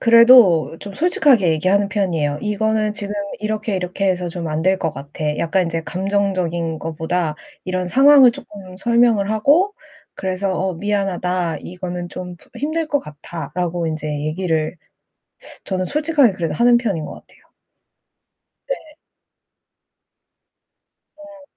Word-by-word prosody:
그래도 230 Hz, -9 st, +6 dB
좀 200 Hz, -1 st, -9 dB
솔직하게 285 Hz, -, +3 dB
얘기하는 185 Hz, +6 st, +2 dB
편이에요. 165 Hz, -8 st, -1 dB
"이거는 215 Hz, 0 st, 0 dB
지금 205 Hz, -1 st, -4 dB, 0.3 s
이렇게 215 Hz, -1 st, -2 dB
이렇게 185 Hz, +2 st, -2 dB
해서 180 Hz, -1 st, -1 dB
좀 170 Hz, -1 st, -5 dB
안 155 Hz, +1 st, -2 dB
될 190 Hz, +2 st, +2 dB
것 165 Hz, -, -1 dB
같아." 150 Hz, +2 st, -4 dB
약간 180 Hz, +2 st, +1 dB
인제 165 Hz, -1 st, -3 dB
감정적인 185 Hz, -4 st, -1 dB
거보다 160 Hz, +1 st, -2 dB, 0.3 s
이런 185 Hz, -1 st, -2 dB
상황을 270 Hz, +4 st, +7 dB
쪼끔 190 Hz, -5 st, -12 dB
설명을 230 Hz, -1 st, +2 dB
하고 295 Hz, -, +3 dB, 0.4 s
그래서 190 Hz, +1 st, -2 dB
"어, 190 Hz, 0 st, -1 dB
미안하다. 180 Hz, -3 st, -1 dB
이거는 180 Hz, -1 st, -6 dB
좀 180 Hz, 0 st, -8 dB, 0.2 s
힘들 315 Hz, +5 st, -2 dB
것 290 Hz, -2 st, 0 dB
같아."라고 170 Hz, +3 st, -5 dB
인제 155 Hz, -1 st, -4 dB, 0.2 s
얘기를 160 Hz, 0 st, -1 dB, 0.9 s
저는 185 Hz, -1 st, -2 dB
솔직하게 295 Hz, -, +2 dB
그래도 170 Hz, -3 st, -3 dB
하는 240 Hz, 0 st, +5 dB
편인 200 Hz, -10 st, -2 dB
것 -, -, -8 dB
같아요. -, -, -17 dB, 1.3 s
네. -, -, +2 dB, 2.4 s
어. 300 Hz, -1 st, -14 dB
185 Hz, 280 characters per minute, -19 LUFS, 170-220 Hz, 2.4 s, 상황을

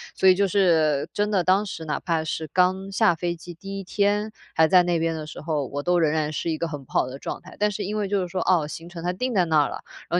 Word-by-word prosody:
所 190 Hz, -, +3 dB
以 185 Hz, -, +6 dB
就 200 Hz, +1 st, +2 dB
是 160 Hz, -7 st, +2 dB
真 205 Hz, 0 st, 0 dB
的， 190 Hz, -4 st, +2 dB
当 190 Hz, +4 st, +3 dB
时 170 Hz, -5 st, -6 dB
哪 150 Hz, -, -2 dB
怕 165 Hz, -3 st, -1 dB
是 160 Hz, 0 st, -3 dB
刚 185 Hz, +1 st, +2 dB
下 200 Hz, -3 st, +3 dB
飞 175 Hz, +1 st, -2 dB
机 175 Hz, +1 st, -10 dB
第 195 Hz, +3 st, -7 dB
一 -, -, -6 dB
天 205 Hz, +3 st, 0 dB, 0.2 s
还 160 Hz, 0 st, +4 dB
在 180 Hz, +1 st, +6 dB
那 175 Hz, -1 st, +1 dB
边 165 Hz, 0 st, 0 dB
的 155 Hz, -1 st, -5 dB
时 -, -, -9 dB
候， 150 Hz, -3 st, -1 dB
我 145 Hz, +2 st, -4 dB
都 175 Hz, +1 st, +2 dB
仍 160 Hz, -3 st, +3 dB
然 155 Hz, -1 st, 0 dB
是 155 Hz, -, -3 dB
一 160 Hz, -, -1 dB
个 170 Hz, -, -2 dB
很 145 Hz, -4 st, -6 dB
不 -, -, -24 dB
好 -, -, +2 dB
的 130 Hz, +1 st, -7 dB
状 -, -, -5 dB
态。 -, -, -13 dB
但 210 Hz, 0 st, +3 dB
是 205 Hz, +1 st, -4 dB
因 205 Hz, +2 st, -3 dB
为 205 Hz, -2 st, -1 dB
就 200 Hz, 0 st, 0 dB
是 180 Hz, -, -3 dB
说， 185 Hz, +1 st, -2 dB
哦， 170 Hz, -5 st, +2 dB
行 165 Hz, +2 st, -8 dB
程 175 Hz, -1 st, -9 dB
它 180 Hz, -, 0 dB
定 250 Hz, +7 st, -2 dB
在 185 Hz, -4 st, +3 dB
那 160 Hz, -2 st, +3 dB
儿 -, -, -2 dB
了， -, -, -7 dB, 0.3 s
然 175 Hz, -, +2 dB
175 Hz, 325 characters per minute, -24 LUFS, 160-195 Hz, 0.3 s, 以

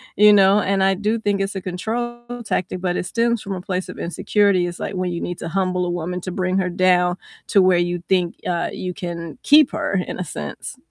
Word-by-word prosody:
you 210 Hz, 0 st, +7 dB
know, 200 Hz, 0 st, +5 dB
and 195 Hz, 0 st, +1 dB
I 195 Hz, -, +4 dB
do 210 Hz, +4 st, -1 dB
think 205 Hz, -2 st, 0 dB
it's 195 Hz, +1 st, -2 dB
a -, -, -2 dB
control 230 Hz, +7 st, -4 dB, 0.2 s
tactic, 185 Hz, -3 st, -2 dB
but 180 Hz, -1 st, -1 dB
it -, -, -2 dB
stems 235 Hz, +3 st, 0 dB
from 200 Hz, -, -5 dB
a 180 Hz, -, -6 dB
place 185 Hz, 0 st, -3 dB
of -, -, -8 dB
insecurity, 185 Hz, +1 st, +1 dB
it's 175 Hz, 0 st, -7 dB
like -, -, -4 dB
when 185 Hz, -1 st, -1 dB
you 170 Hz, -, -3 dB
need 175 Hz, 0 st, -5 dB
to -, -, -5 dB
humble 185 Hz, 0 st, 0 dB
a -, -, -2 dB
woman 175 Hz, +1 st, -3 dB
to 185 Hz, -, -5 dB
bring 185 Hz, +1 st, 0 dB
her 185 Hz, -1 st, 0 dB
down 180 Hz, -1 st, +2 dB, 0.3 s
to 200 Hz, -, +4 dB
where 185 Hz, -1 st, +4 dB
you 175 Hz, 0 st, -1 dB
think, 180 Hz, -3 st, +1 dB
uh, 170 Hz, -1 st, -1 dB
you 180 Hz, -1 st, -5 dB
can 170 Hz, -2 st, -6 dB
keep 300 Hz, -1 st, +6 dB
her, -, -, -2 dB
in -, -, -5 dB
a -, -, -1 dB
sense. 75 Hz, -, -7 dB
185 Hz, 235 wpm, -21 LUFS, 180-200 Hz, 0.3 s, you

